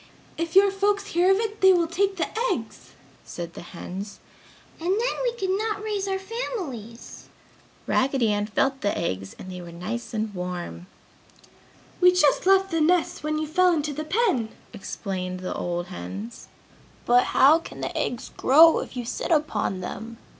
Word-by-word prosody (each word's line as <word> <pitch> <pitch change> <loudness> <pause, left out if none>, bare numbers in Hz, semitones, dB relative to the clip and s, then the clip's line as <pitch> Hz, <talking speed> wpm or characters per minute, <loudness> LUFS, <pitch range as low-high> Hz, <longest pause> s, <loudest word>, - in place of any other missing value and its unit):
"If 335 +1 -4
your 395 0 +7
folks 405 +1 +1
hear 350 +2 +4
of 385 - +5
it 435 -1 -3
they 380 0 +7
will 345 -2 +3
take 390 +4 0
the 330 - +1 0.3
eggs!" - - -6 0.3
said 170 -1 -7
the - - -9
hens, 190 +3 -8 0.6
"and 335 +2 -3
then 450 +6 +1
we - - 0
could 380 -5 -1
not 430 -1 -2
raise 410 -2 -2
our 385 0 0
families!" 370 - -6 0.6
Raggedy 260 -4 +2
Ann 205 0 -1
felt 270 +5 0
the 205 - 0
eggs 95 - -3
and 185 - -9
they 180 0 -7
were 170 -1 -9
nice 210 +8 -5
and 220 -2 -2
warm. 180 -1 -5 1.1
"We 360 0 +7
just 360 0 +3
left 385 0 +4
the 330 -1 +1
nests 345 +2 +2
when 305 0 -1
you 310 - -1
fell 360 +4 +3
into 300 -2 -1
the 305 +2 -4
pen!" 310 - +1 0.2
explained 185 -3 -5
the 185 - -3
old 175 0 -3
hens. 95 +6 -7 0.6
"But 245 +1 +5
how 300 +5 +5
can - - -10
the - - -4
eggs 245 - -3
grow 320 +5 +6
if - - -7
you 245 - -3
sit - - -4
upon 300 - 0
them?" 225 +5 -7
300 Hz, 175 wpm, -25 LUFS, -, 1.1 s, your